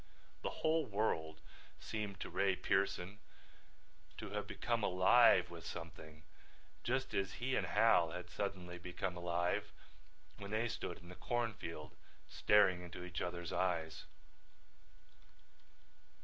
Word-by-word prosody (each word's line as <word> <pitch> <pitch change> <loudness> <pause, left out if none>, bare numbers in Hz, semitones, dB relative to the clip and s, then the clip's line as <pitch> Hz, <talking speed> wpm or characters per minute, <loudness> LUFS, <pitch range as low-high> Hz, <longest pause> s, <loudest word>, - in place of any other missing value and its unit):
The - - -1 0.2
whole 160 0 +3
world 80 -7 -1 0.4
seemed 105 -3 -4
to - - -4
Ray 95 -1 +2
Pearson 95 +1 0 1.0
to - - -6
have - - -3
become 115 -2 -1
alive 95 +1 +6
with 85 -1 -8
something 80 -2 -8 0.6
just 130 +2 -1
as 95 0 0
he 130 +2 -1
and - - +1
Hal 100 -7 +5
had 90 +2 -6
suddenly 90 -3 -4
become 90 +1 -3
alive 85 0 0 0.7
when 100 - -7
they 110 +2 +1
stood 90 - -4
in 85 +1 -14
the - - -8
corn 120 +1 -1
field 80 -7 -7 0.3
staring 100 -4 +4
into 90 0 -8
each 90 -2 -4
other's 85 -1 -3
eyes. 85 -4 -1
90 Hz, 125 wpm, -37 LUFS, 85-105 Hz, 1.0 s, alive